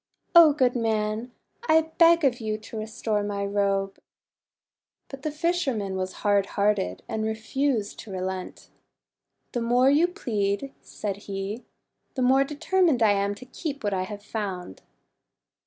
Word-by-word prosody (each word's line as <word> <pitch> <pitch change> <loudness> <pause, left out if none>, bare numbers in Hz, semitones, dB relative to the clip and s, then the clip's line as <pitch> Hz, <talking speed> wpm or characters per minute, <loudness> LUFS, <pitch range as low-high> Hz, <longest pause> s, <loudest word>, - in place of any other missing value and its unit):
O 335 -3 +9
good 260 -4 +2
man, 220 0 -1 0.4
I 320 0 +4
beg 335 0 +6
of 250 -2 +2
you 215 -1 -2
to 220 +1 -9
restore 215 -1 -2
my 205 -1 -2
robe!' 195 -1 0 1.1
But 275 -1 -9
the 310 - -2
fisherman 295 - -1
was 185 0 -2
hard 200 -1 +3
hearted, 200 - +1
and 220 - -2
re 220 0 -1
fused 225 -1 -1
to 215 - -9
relent. 185 0 -5 0.8
'The 240 - -2
more 245 +3 +4
you 310 +5 +4
plead," 235 - -2
said 200 -2 -5
he, 200 +3 -5 0.5
"the 260 - 0
more 265 +2 +5
determined 295 -1 +1
I 215 - +5
am 200 0 0
to 230 - -12
keep 280 +1 -6
what 205 -1 0
I 185 -1 -1
have 205 +1 -8
found." 195 - -5
220 Hz, 150 wpm, -26 LUFS, 200-270 Hz, 1.1 s, O